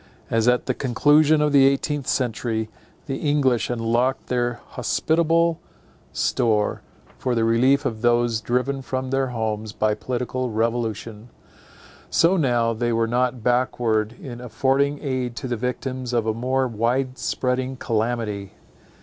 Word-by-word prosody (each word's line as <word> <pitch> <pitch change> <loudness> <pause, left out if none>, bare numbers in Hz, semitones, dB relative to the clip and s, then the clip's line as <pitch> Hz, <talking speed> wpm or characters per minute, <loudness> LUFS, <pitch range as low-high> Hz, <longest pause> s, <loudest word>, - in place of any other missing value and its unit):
As 115 0 +2
at 125 0 +3
the 130 - 0
conclusion 145 +5 +3
of 150 - +2
the 135 -1 +6
eighteenth 140 0 -1
century, 110 -3 -1 0.4
the 135 - -3
English 140 -5 +1
unlocked 120 +2 0
their 120 -1 0
hospitable 165 +6 +1 0.5
store, 105 -3 0 0.4
for 125 -1 -1
the 115 - +1
relief 130 +5 +3
of 110 -4 -2
those 120 -1 +2
driven 125 +4 -1
from 130 0 -4
their 135 0 +1
homes 110 -3 -3
by 110 -1 +1
political 125 +2 -3
revolution; 115 0 -2 0.8
so 170 +3 +4
now 120 -8 +2
they 120 +1 -1
were 115 0 +2
not 125 0 0
backward 120 -3 +1
in 120 -2 -8
affording 135 +5 +1
aid 130 -4 -2
to 130 - -5
the 120 - -1
victims 125 +1 -4
of 115 -2 +1
a 110 - +1
more 130 +3 0
wide 125 +3 -1
spreading 130 +1 -1
calamity. 110 -4 -2
125 Hz, 140 wpm, -23 LUFS, 115-130 Hz, 0.8 s, the